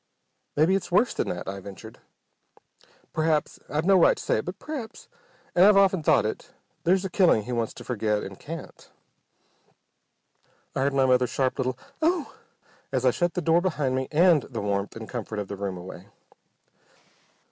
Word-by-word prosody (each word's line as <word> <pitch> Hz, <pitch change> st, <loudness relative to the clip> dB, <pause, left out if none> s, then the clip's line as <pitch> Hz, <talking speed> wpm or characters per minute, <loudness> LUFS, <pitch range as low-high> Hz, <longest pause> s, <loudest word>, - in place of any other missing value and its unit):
"Maybe 155 Hz, +5 st, +3 dB
it's 195 Hz, -2 st, -1 dB
worse 215 Hz, +7 st, +3 dB
than -, -, -2 dB
that," 90 Hz, -, -5 dB
I 100 Hz, +1 st, -4 dB
ventured. 100 Hz, +3 st, -11 dB, 1.1 s
"P'r'aps 155 Hz, -1 st, 0 dB
I've 150 Hz, +2 st, -1 dB
no 190 Hz, 0 st, +5 dB
right -, -, +5 dB
to -, -, -7 dB
say -, -, +1 dB
it 110 Hz, -, -3 dB
but 180 Hz, +3 st, -5 dB
p'r'aps, 275 Hz, -6 st, -7 dB, 0.5 s
and 175 Hz, -, +5 dB
I've 205 Hz, 0 st, +7 dB
often 195 Hz, -3 st, +4 dB
thought 150 Hz, -, +3 dB
it, 110 Hz, -, -5 dB, 0.3 s
there's 185 Hz, +3 st, +3 dB
a -, -, -2 dB
killing 175 Hz, -, +4 dB
he 125 Hz, -, -6 dB
wants 115 Hz, -2 st, -2 dB
to -, -, -10 dB
forget, 105 Hz, -3 st, -1 dB
and 95 Hz, -1 st, -8 dB
can't!" 165 Hz, +2 st, -9 dB, 1.9 s
I -, -, -1 dB
heard 140 Hz, +1 st, +1 dB
my 135 Hz, -1 st, +4 dB
mother's 125 Hz, -1 st, +3 dB
sharp 130 Hz, -1 st, -1 dB
little 130 Hz, -1 st, -1 dB, 0.2 s
"Oh!" 330 Hz, -1 st, +1 dB, 0.6 s
as 130 Hz, -1 st, 0 dB
I 130 Hz, -, +6 dB
shut 175 Hz, +6 st, -1 dB
the 180 Hz, -, -1 dB
door 165 Hz, +1 st, +4 dB
behind 150 Hz, -8 st, -1 dB
me 130 Hz, 0 st, -1 dB
and 165 Hz, 0 st, +5 dB
the 120 Hz, -4 st, -7 dB
warmth 100 Hz, 0 st, -2 dB
and 115 Hz, -1 st, -8 dB
comfort 110 Hz, -3 st, -5 dB
of 105 Hz, -1 st, -3 dB
the 100 Hz, -, -4 dB
room 95 Hz, -2 st, -4 dB
away. 90 Hz, +1 st, -10 dB
135 Hz, 180 wpm, -26 LUFS, 110-180 Hz, 1.9 s, I've